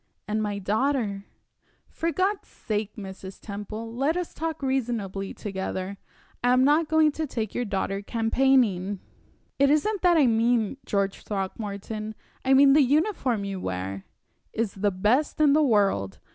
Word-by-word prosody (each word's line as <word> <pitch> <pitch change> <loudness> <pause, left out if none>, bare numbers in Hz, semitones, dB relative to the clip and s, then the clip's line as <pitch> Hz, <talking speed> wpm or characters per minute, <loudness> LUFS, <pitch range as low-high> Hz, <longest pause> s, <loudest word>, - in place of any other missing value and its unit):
"And 215 +1 -1
my 205 -1 -2
daughter 210 0 0 0.3
" - - -53 0.3
"For 335 +1 -2
God's 385 +4 0
sake, 210 -2 -4
Mrs. 190 -2 -9
Temple, 215 +2 -7
let 280 +7 0
us 360 -2 -4
talk 320 -2 -4
reasonably 225 -7 -2
together! 190 -1 -4 0.5
I 245 0 +4
am 255 +1 +4
not 300 +4 +4
going 315 -1 +4
to 315 +1 -3
take 220 -5 -3
your 245 - -1
daughter 195 -1 -2
campaigning." 225 -4 +2 0.6
"It 280 0 +5
isn't 370 +8 +1
that 350 -2 +4
I 295 - +5
mean, 230 0 +2
George 200 -1 -1
Throckmorton. 210 +2 -4 0.3
I 265 +1 +4
mean 275 0 +7
the 300 - +6
uniform 280 - +1
you 195 -1 -4
wear 95 - -4 0.2
" - - -45
"Is 225 -3 -1
the 205 +1 +1
best 210 +13 +1
in 295 -2 +5
the 310 - +4
world! 200 - +2
225 Hz, 160 wpm, -26 LUFS, 200-280 Hz, 0.6 s, mean